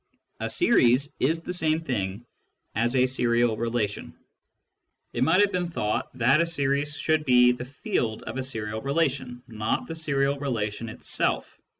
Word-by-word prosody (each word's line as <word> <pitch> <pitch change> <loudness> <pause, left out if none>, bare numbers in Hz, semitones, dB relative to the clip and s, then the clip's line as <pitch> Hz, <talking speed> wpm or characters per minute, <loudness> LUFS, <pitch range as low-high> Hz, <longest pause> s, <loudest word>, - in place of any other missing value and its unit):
A - - -2
series 140 - +3
is 160 +5 +1
the 180 - -4
same 160 -2 +1
thing 110 -6 -3 0.5
as 120 +4 +1
a 130 0 +4
serial 120 -2 +2
relation. 115 -2 -2 1.0
It 120 - +1
might 165 +8 +4
have 205 -1 +3
been 180 -1 -1
thought 105 -11 -2
that 135 +6 +4
a 170 - +1
series 145 -2 0
should 155 -1 +1
be 125 -3 +5
the 125 0 -5
field. 130 - -2
of - - -6
a 130 - -2
serial 110 -4 -4
relation, 135 -4 -1
not 110 -2 -2
the 165 - -6
serial 140 -3 0
relation 115 -5 -3
itself. - - -2
130 Hz, 160 wpm, -26 LUFS, 115-155 Hz, 1.0 s, be